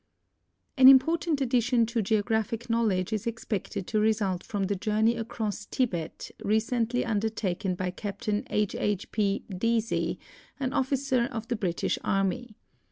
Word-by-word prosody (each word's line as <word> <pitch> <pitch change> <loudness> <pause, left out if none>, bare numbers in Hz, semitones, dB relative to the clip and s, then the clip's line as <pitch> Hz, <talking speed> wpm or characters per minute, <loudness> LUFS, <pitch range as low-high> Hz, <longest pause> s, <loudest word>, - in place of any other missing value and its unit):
An 260 0 +8
important 305 +3 +5
addition 245 -2 +2
to 230 0 -1
geographic 220 +2 0
knowledge 215 -4 +1
is 215 +2 -2
expected 215 -4 -3
to 215 - 0
result 210 -4 +1
from 205 -2 -3
the 200 +1 0
journey 215 +3 +1
across 220 -2 -4
Tibet 175 -11 -2
recently 230 +3 +1
undertaken 205 -4 -1
by 180 0 -2
Captain 205 +2 -3
II. 210 0 +2
II. 210 -1 +1
P. 205 -2 0
Deasy, 230 +3 0 0.4
an 260 -2 -1
otiicer 260 -2 +1
of 225 0 -5
the 240 - +1
British 185 -6 -1
.Army. 195 +4 -1
220 Hz, 135 wpm, -28 LUFS, 200-235 Hz, 0.4 s, An